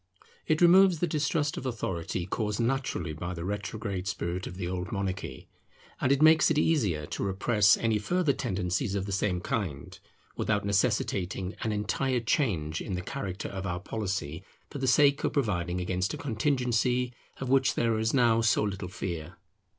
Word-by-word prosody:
It 155 +1 +2
removes 185 +1 +7
the 175 - +1
distrust 150 -1 0
of - - -5
authority 90 -7 -3
caused 105 +2 -2
naturally 115 -9 -1
by 85 +3 -5
the 85 0 -5
retrograde 100 -1 -4
spirit 90 -1 -3
of 90 - -8
the 90 -3 -3
old 90 +3 -4
monarchy; 95 - -4 0.5
and 130 - +1
it 140 +2 +3
makes 155 0 +6
it 160 - +1
easier 105 - +1
to - - -4
repress 100 +1 +3
any 110 -2 +1
further 170 - +1
tendencies 100 -1 -1
of 100 -1 -1
the 100 - -5
same 95 -2 0
kind, 85 -9 -4 0.4
without 105 -2 0
necessitating 100 -3 0
an 110 - -1
entire 120 +5 0
change 95 - 0
in 95 - -4
the 90 - -4
character 95 +1 -5
of 95 -1 -5
our 90 0 -2
policy 95 -5 -4 0.3
for 140 - -5
the 130 - -1
sake 140 +2 +4
of - - 0
providing 90 - 0
against 90 +1 -1
a - - -7
contingency, 125 -1 0 0.3
of 130 - -4
which 135 0 +3
there 115 -2 +1
is 110 +1 +1
now 120 -4 +4
so 110 -2 +3
little 100 -3 -3
fear. 85 -1 -5
105 Hz, 175 wpm, -29 LUFS, 90-125 Hz, 0.5 s, removes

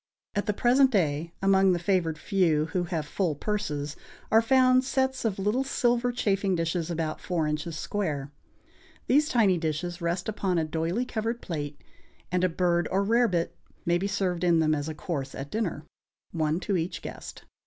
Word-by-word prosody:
At 205 +2 -1
the 210 - +2
present 255 +5 +4
day 165 - 0
among 195 -1 +5
the - - +1
favored 175 -3 0
few, 165 -6 +2
who 180 -1 0
have 165 -3 -2
full 165 0 -1
purses, 150 -6 -3 0.4
are 225 - +6
found 255 +1 +4
sets 265 -1 0
of 210 -4 0
little 210 +7 +1
silver 245 -2 +1
chafing 200 -5 +1
dishes 165 0 -1
about 160 -2 -2
four 170 -4 -1
inches 150 +1 -3
square. 150 -7 -3 0.7
These 295 +4 +3
tiny 200 -7 +3
dishes 170 +2 -3
rest 170 +2 -1
upon 195 -4 -1
a 160 - +1
doylie 165 +9 -1
covered 230 +1 -2
plate, 145 -7 -5 0.5
and 180 0 +1
a 185 - +4
bird 175 0 +1
or 195 +1 +1
rarebit 210 -6 +2 0.3
may 175 +1 +2
be 195 - -1
served 185 -3 -1
in 170 -2 +4
them 155 -1 +3
as 150 0 -2
a 155 - -5
course 140 -4 -4
at 140 +1 -6
dinner, 180 -9 -2 0.5
one 160 0 0
to 195 -2 0
each 170 +1 -3
guest. - - -8
180 Hz, 175 wpm, -27 LUFS, 160-210 Hz, 0.7 s, are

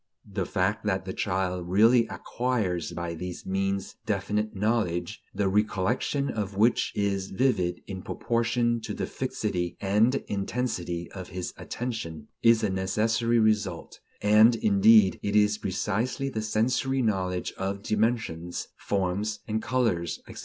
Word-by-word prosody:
The 100 -3 -3
fact 100 +3 0
that 95 -3 0
the 95 - -4
child 90 -2 -2
really 115 +5 +5
acquires 110 -10 -2
by 85 0 -4
these 90 +2 -6
means 95 0 -2
definite 105 +1 -1
knowledge, 100 -3 -1
the 100 - 0
recollection 105 +7 0
of 100 -3 -4
which 115 +4 +3
is 100 -2 -1
vivid 95 -6 +1
in 95 -1 -6
proportion 120 +2 0
to - - -4
the - - -2
fixity 90 -1 -3
and 105 +6 +3
intensity 95 -5 -2
of 95 -2 -7
his 90 -1 -5
attention, 95 -11 -5
is 115 -1 +5
a 105 - +1
necessary 110 +5 +1
result; 105 -5 0 0.2
and, 110 +3 +6
indeed, 210 - +5
it 100 0 -2
is 105 0 +4
precisely 115 +7 -1
the 110 -4 -3
sensory 125 +5 +1
knowledge 95 -4 -1
of 100 +1 -3
dimensions, 105 -6 -1
forms 100 +2 -1
and 110 0 -1
colors, 110 -11 0
etc. - - -9
105 Hz, 135 wpm, -27 LUFS, 95-115 Hz, 0.2 s, and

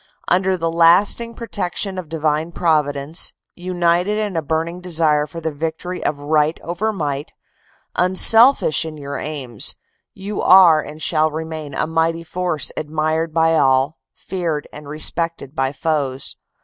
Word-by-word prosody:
"Under 185 +1 +2
the 165 -1 -2
lasting 185 +8 +4
protection 195 -3 -3
of 170 -4 -9
Divine 155 +1 -1
Providence, 150 -1 0 0.2
united 175 +2 0
in 210 -3 -3
a 165 - 0
burning 160 +4 -3
desire 155 -4 +1
for 165 +3 -8
the 160 -1 -3
victory 165 +4 -5
of 150 - -1
right 150 +2 0
over 175 +6 -2
might, 145 -7 -4 0.6
unselfish 225 - +5
in 160 -1 -7
your 140 -1 -6
aims, 135 -8 -1 0.4
you 200 +2 -5
are 175 -4 +6
and 155 +1 -9
shall 155 -1 +2
remain 155 -2 -6
a - - 0
mighty 165 +1 -1
force 175 -4 -2
admired 155 +1 -2
by 165 0 +2
all, 135 0 +2 0.2
feared 170 -5 -4
and 150 -1 -10
respected 155 -1 -1
by 135 0 0
foes. 140 -2 -2
160 Hz, 140 wpm, -19 LUFS, 150-180 Hz, 0.6 s, are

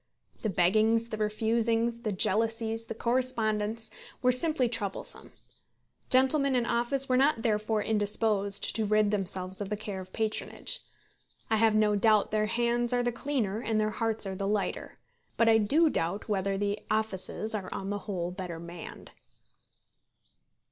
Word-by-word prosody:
The 220 - -1
beggings, 215 +6 +2
the 215 - -4
refusings, 225 +2 0
the 225 -3 -3
jealousies, 225 +3 +1
the 225 - -6
correspondence, 225 -3 -1 0.3
were 250 - +5
simply 255 0 +2
troublesome. 215 -4 -4 0.8
Gentlemen 265 +1 +5
in 245 -1 +1
office 250 +4 +2
were 255 - +2
not 270 -3 +2
therefore 215 -1 0
indisposed 205 -1 +1
to 220 - 0
rid 210 0 +2
themselves 190 -1 -2
of 200 - -4
the 210 - -2
care 205 -3 -5
of 185 0 -12
patronage. 220 -1 -2 0.7
I 220 - +4
have 220 0 +3
no 210 -1 +3
doubt 210 0 +3
their 215 0 +1
hands 240 +1 +1
are 245 0 +1
the 240 - 0
cleaner 240 -5 -2
and 220 -2 0
their 215 0 0
hearts 225 0 -1
are 195 - -4
the 195 +1 -3
lighter; 205 0 -2 0.4
but 230 - +3
I 225 -1 +6
do 295 +11 +3
doubt 195 - -2
whether 195 -2 -1
the 205 +1 -1
offices 215 0 -1
are 200 -4 -4
on 195 +1 -4
the 205 - -2
whole 175 -3 -2
better 180 -3 -6
manned. 170 0 -10
215 Hz, 155 wpm, -29 LUFS, 205-235 Hz, 0.8 s, I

